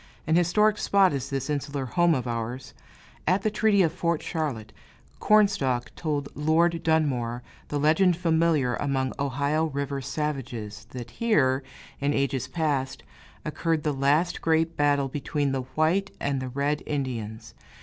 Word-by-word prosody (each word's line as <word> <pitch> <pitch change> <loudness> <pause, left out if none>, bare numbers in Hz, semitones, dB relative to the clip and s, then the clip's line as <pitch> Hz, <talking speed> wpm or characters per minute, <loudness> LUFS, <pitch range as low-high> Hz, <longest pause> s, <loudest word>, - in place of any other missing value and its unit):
An 160 - +2
historic 210 +5 +3
spot 195 -4 +4
is 135 -1 -3
this 135 -2 -2
insular 145 -2 -2
home 175 +4 +3
of 130 -2 -2
ours. 120 +2 -4 0.5
At 185 +4 +2
the 215 - +1
treaty 210 -2 +3
of 165 -2 +1
Fort 170 -2 -1
Charlotte, 140 -10 -3 0.5
Cornstalk 195 - +2
told 145 -3 -2
Lord 165 +3 +2
Dunmore 130 -8 0 0.2
the 145 - -2
legend 160 +4 +3
familiar 160 -6 +2
among 135 -2 -1
Ohio 140 +3 0
River 140 -2 -3
savages 130 -7 -4
that 120 -2 -8
here, 135 - +2 0.4
in 145 +1 0
ages 135 -1 0
past, 140 -3 -2 0.4
occurred 160 0 -1
the 150 - 0
last 145 +6 +1
great 165 0 +1
battle 145 -1 +2
between 145 +1 -2
the 130 -1 -3
white 180 +6 +2
and 140 -2 -1
the 130 - -4
red 140 +3 -1
Indians. 115 -6 -4
145 Hz, 145 wpm, -26 LUFS, 130-165 Hz, 0.5 s, spot